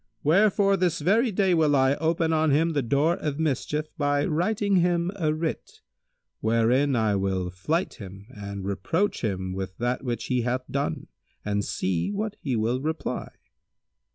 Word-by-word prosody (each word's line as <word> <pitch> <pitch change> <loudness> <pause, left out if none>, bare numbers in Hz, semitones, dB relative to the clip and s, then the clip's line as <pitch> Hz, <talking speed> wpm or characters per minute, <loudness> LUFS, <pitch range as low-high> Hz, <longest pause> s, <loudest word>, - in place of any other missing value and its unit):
Wherefore 195 +4 +4
this 175 -3 +1
very 225 +6 +2
day 190 -1 +2
will 155 -3 +3
I 135 0 +4
open 160 +1 +1
on 160 0 +2
him 160 +4 +2
the 145 - +1
door 140 +8 +1
of 150 -2 -3
mischief 150 0 -1
by 145 0 +1
writing 200 +5 +1
him 175 0 +2
a 160 -6 0
writ 155 +1 -4 0.6
wherein 120 +5 +2
I 110 -3 +2
will 95 -2 -1
flyte 155 - -2
him 100 +1 -10
and 100 -4 -7
reproach 105 - -1
him 95 -4 -2
with 95 -1 -5
that 120 +2 -1
which 120 -3 -3
he 125 -1 0
hath 125 +2 -1
done 140 - -2 0.4
and 105 0 0
see 95 - -1
what 210 +1 -3
he 135 -4 -1
will 115 +4 0
reply." 160 +2 -3
145 Hz, 160 wpm, -26 LUFS, 110-170 Hz, 0.6 s, Wherefore